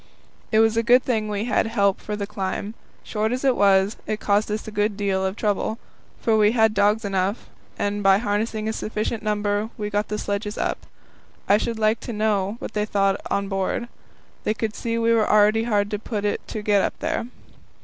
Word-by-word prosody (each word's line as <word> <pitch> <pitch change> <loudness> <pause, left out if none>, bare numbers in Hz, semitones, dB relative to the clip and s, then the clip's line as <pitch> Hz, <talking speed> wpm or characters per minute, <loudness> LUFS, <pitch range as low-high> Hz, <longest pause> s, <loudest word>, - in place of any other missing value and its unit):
It 220 - +3
was 225 0 +3
a - - +4
good 245 +2 +5
thing 220 -4 0
we 205 0 -2
had 230 -1 +1
help 200 -4 +1
for 210 - -4
the 205 -1 -3
climb. 200 +1 -4 0.3
Short 215 0 -1
as 255 +2 -2
it 260 -2 +4
was, 195 +1 +3
it 215 0 -2
caused 205 +1 +1
us 215 +1 -3
a - - -5
good 210 0 0
deal 195 -2 0
of 190 +1 -1
trouble; 215 +1 -1 0.5
but 225 -2 +4
we 210 +1 +4
had 220 -2 +4
dogs 210 +2 +2
enough, 195 +2 -2 0.3
and 205 0 -1
by 195 -1 +5
harnessing 215 +1 -1
a 220 - -1
sufficient 215 +1 -3
number 210 0 -1
we 210 -1 -4
got 205 0 0
the 210 - -3
sledges 205 +1 -3
up. - - -2 0.6
I 200 - +5
should 230 0 -2
like 215 +1 +2
to 240 - -6
know 210 -1 0
what 225 - -7
they 210 - 0
thought 195 -2 +1
on 200 0 0
board. 195 +5 -2 0.5
They 215 - 0
could 220 0 -2
see 230 -1 -2
we 230 0 +3
were 220 -2 +2
already 215 +2 +4
hard 205 -3 +1
put 210 -3 -3
to 205 - +1
it - - -5
to 215 - -5
get 205 -1 +3
up - - -1
here. 315 -6 -2
210 Hz, 210 wpm, -23 LUFS, 205-220 Hz, 0.6 s, good